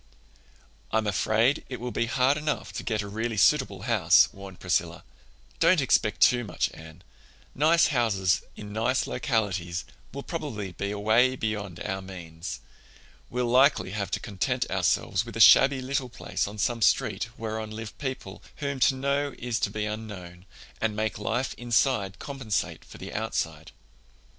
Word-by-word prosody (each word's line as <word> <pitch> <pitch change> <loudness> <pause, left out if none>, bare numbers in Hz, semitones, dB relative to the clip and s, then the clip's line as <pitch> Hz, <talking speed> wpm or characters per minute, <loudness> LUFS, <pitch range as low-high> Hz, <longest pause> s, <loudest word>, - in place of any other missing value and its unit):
"I'm 110 0 +1
afraid 110 - +2
it 125 - -5
will 125 +1 -4
be 115 - -1
hard 130 +3 +3
enough 150 0 -3
to - - -4
get 110 -3 -1
a - - -7
really 110 +2 -3
suitable 100 -3 +3
house," 110 -8 +5
warned 95 -2 -11
Priscilla. - - -1 0.6
"Don't 170 +1 +5
expect 110 -6 +2
too 120 -1 +5
much, 110 - -2
Anne. 80 -1 -13 0.5
Nice 160 +4 +4
houses 100 -7 +2
in 105 -1 -9
nice 120 +4 +1
localities 100 -7 -1 0.3
will 140 +1 -6
probably 115 - -5
be 100 +3 -4
away 110 +5 +3
beyond 105 -7 -3
our 95 0 -3
means. 90 -2 -8 0.7
We'll 125 0 -1
likely 130 -3 +4
have 100 -2 -3
to - - -1
content 100 -3 -1
ourselves 100 +1 +1
with 115 -2 -8
a - - -4
shabby 135 +4 +7
little 130 -1 -2
place 115 - -3
on 105 +1 -8
some 115 +2 0
street 110 - +2
whereon 110 -1 -4
live 110 0 -7
people 130 -9 -5
whom 140 -2 -3
to 130 +2 +4
know 140 +1 -1
is 120 -2 -2
to - - 0
be 105 -1 -3
unknown, 95 -5 -7 0.3
and 110 -2 0
make 110 0 -2
life 120 +3 -1
inside 120 -4 +1
compensate 135 -8 -3
for - - -13
the - - -8
outside." 80 -1 -3
110 Hz, 155 wpm, -27 LUFS, 100-130 Hz, 0.7 s, shabby